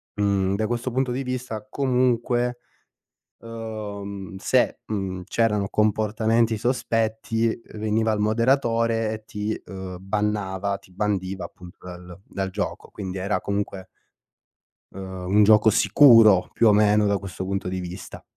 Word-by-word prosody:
mhmm, 100 Hz, -2 st, +1 dB
da 110 Hz, +2 st, -1 dB
questo 120 Hz, +2 st, -2 dB
punto 130 Hz, +1 st, 0 dB
di 130 Hz, +2 st, -2 dB
vista 125 Hz, -4 st, -5 dB
comunque 125 Hz, -1 st, 0 dB, 0.8 s
uhm, 100 Hz, -4 st, -7 dB
se, -, -, +1 dB
mhmm, 95 Hz, -3 st, -3 dB
c'erano 105 Hz, -3 st, +1 dB
comportamenti 110 Hz, +2 st, +1 dB
sospetti, 115 Hz, -1 st, -1 dB, 0.2 s
veniva 110 Hz, +1 st, 0 dB
il 105 Hz, -, -2 dB
moderatore 115 Hz, 0 st, +1 dB
e 110 Hz, 0 st, -8 dB
ti, 105 Hz, +1 st, -4 dB
uhm, 95 Hz, -2 st, -7 dB
bannava, 100 Hz, -1 st, -2 dB
ti 95 Hz, -, -22 dB
bandiva, 95 Hz, -1 st, -2 dB
appunto 90 Hz, 0 st, -13 dB
dal 90 Hz, 0 st, -10 dB
dal 95 Hz, -1 st, -3 dB
gioco. 100 Hz, +2 st, -4 dB
Quindi 95 Hz, -1 st, -6 dB
era 100 Hz, +3 st, -1 dB
comunque 100 Hz, -2 st, -3 dB, 1.1 s
uhm, 95 Hz, -1 st, -7 dB
un 105 Hz, -, +6 dB
gioco 110 Hz, +1 st, +6 dB
sicuro 115 Hz, -4 st, +6 dB
più 115 Hz, -, +4 dB
o -, -, +6 dB
meno, 105 Hz, 0 st, +4 dB
da 100 Hz, -1 st, +1 dB
questo 95 Hz, -1 st, -6 dB
punto 95 Hz, 0 st, -3 dB
di 95 Hz, 0 st, -3 dB
vista. 90 Hz, -1 st, -8 dB
105 Hz, 135 wpm, -24 LUFS, 95-115 Hz, 1.1 s, un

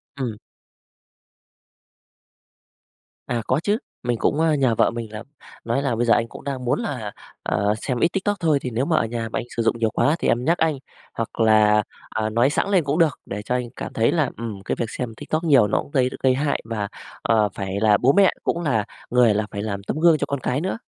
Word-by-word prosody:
Ừm. 125 Hz, -6 st, -4 dB, 2.9 s
À, 120 Hz, -1 st, -1 dB
có 130 Hz, -, +2 dB
chứ, 205 Hz, +3 st, +2 dB, 0.3 s
mình 120 Hz, -1 st, 0 dB
cũng, 145 Hz, -, +1 dB
ơ, 160 Hz, -1 st, +3 dB
nhờ 130 Hz, -5 st, +2 dB
vợ -, -, +3 dB
mình 115 Hz, -2 st, -6 dB
là 110 Hz, 0 st, -7 dB, 0.4 s
nói 120 Hz, +4 st, 0 dB
là 135 Hz, -4 st, 0 dB
"Bây 120 Hz, +2 st, 0 dB
giờ 115 Hz, -, +5 dB
anh 115 Hz, -, +1 dB
cũng -, -, -11 dB
đang 135 Hz, -3 st, -4 dB
muốn 125 Hz, -, +1 dB
là, 125 Hz, -, -4 dB, 0.3 s
ờ, 100 Hz, +1 st, +1 dB
xem 125 Hz, -3 st, -2 dB
ít -, -, +4 dB
TikTok 200 Hz, +1 st, 0 dB
thôi, 160 Hz, -4 st, +2 dB
thì 125 Hz, -, -3 dB
nếu 125 Hz, +4 st, 0 dB
mà 165 Hz, -, +1 dB
ở -, -, +2 dB
nhà 115 Hz, 0 st, -4 dB
mà -, -, -2 dB
anh -, -, -5 dB
sử 115 Hz, -, +1 dB
dụng 115 Hz, -, +1 dB
nhiều 115 Hz, -1 st, +2 dB
quá 145 Hz, +7 st, +2 dB
thì -, -, -1 dB
em 120 Hz, +2 st, +1 dB
nhắc 170 Hz, +3 st, +3 dB
anh, 160 Hz, -3 st, +1 dB, 0.4 s
hoặc 115 Hz, 0 st, -5 dB
là, 105 Hz, -1 st, +5 dB, 0.3 s
à, 110 Hz, -1 st, -2 dB
nói 120 Hz, +4 st, +3 dB
xẵng 165 Hz, -, 0 dB
lên 190 Hz, -4 st, +3 dB
cũng 145 Hz, +4 st, -1 dB
được 160 Hz, -4 st, +2 dB
để 105 Hz, -, -5 dB
cho 125 Hz, +4 st, -2 dB
anh 125 Hz, -1 st, -2 dB
cảm -, -, -6 dB
thấy 115 Hz, +1 st, +2 dB
là, 155 Hz, -6 st, +1 dB
ừm, 110 Hz, -4 st, -6 dB
cái -, -, -2 dB
việc -, -, +1 dB
xem 125 Hz, -1 st, -5 dB
TikTok 155 Hz, +2 st, -2 dB
nhiều 140 Hz, -10 st, +5 dB
nó -, -, +1 dB
cũng -, -, -13 dB
gây 130 Hz, -3 st, +2 dB
gây 130 Hz, -1 st, +5 dB
hại, 140 Hz, +1 st, 0 dB
và, 110 Hz, -3 st, -3 dB, 0.3 s
ờ, 110 Hz, -2 st, +2 dB
phải 95 Hz, 0 st, -3 dB
là 105 Hz, -1 st, +4 dB
bố 130 Hz, +3 st, +3 dB
mẹ 195 Hz, -2 st, +5 dB
cũng 170 Hz, -, -1 dB
là 115 Hz, -9 st, +1 dB, 0.2 s
người 120 Hz, -3 st, +4 dB
là 105 Hz, +1 st, -1 dB
phải 100 Hz, -, -4 dB
làm 100 Hz, -2 st, -4 dB
tấm 150 Hz, -, -3 dB
gương 165 Hz, -1 st, +5 dB
cho 145 Hz, -, -1 dB
con 140 Hz, -, -2 dB
cái 130 Hz, +2 st, -1 dB
nữa." 190 Hz, +5 st, -2 dB
120 Hz, 240 wpm, -23 LUFS, 110-145 Hz, 2.9 s, giờ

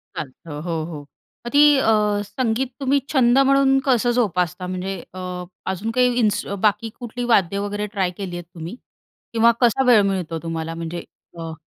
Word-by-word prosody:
चालतं. 150 Hz, +2 st, -7 dB
हो, 165 Hz, -1 st, -2 dB
हो. 160 Hz, -3 st, -7 dB, 0.5 s
मग -, -, -4 dB
ती 285 Hz, -, +4 dB, 0.2 s
अ, 265 Hz, -, +1 dB, 0.4 s
संगीत 240 Hz, +4 st, -1 dB
तुम्ही 275 Hz, +1 st, +2 dB
छंद 250 Hz, -2 st, +4 dB
म्हणून 275 Hz, 0 st, +4 dB
कसं 245 Hz, -3 st, +3 dB
जोपासता? 180 Hz, -6 st, 0 dB
म्हणजे 185 Hz, +1 st, -4 dB, 0.2 s
अ, 185 Hz, -, -8 dB, 0.5 s
अजून 200 Hz, +4 st, -3 dB
काही 250 Hz, -1 st, +4 dB
इन्सु 210 Hz, -3 st, 0 dB
बाकी 210 Hz, +1 st, +2 dB
कुठली 245 Hz, 0 st, -5 dB
वाद्य 195 Hz, -1 st, +2 dB
वगैरे 205 Hz, +1 st, -3 dB
ट्राय 195 Hz, -4 st, -1 dB
केली 190 Hz, -3 st, -5 dB
आहेत 175 Hz, -, -8 dB
तुम्ही? 165 Hz, +6 st, -7 dB, 0.6 s
किंवा 230 Hz, +1 st, +5 dB
कसा 245 Hz, +2 st, +4 dB
वेळ 235 Hz, -4 st, +7 dB
मिळतो 185 Hz, -5 st, -1 dB
तुम्हाला? 165 Hz, 0 st, -4 dB
म्हणजे 165 Hz, +1 st, -5 dB, 0.4 s
अ 165 Hz, -1 st, -5 dB
205 Hz, 165 wpm, -22 LUFS, 175-240 Hz, 0.6 s, वेळ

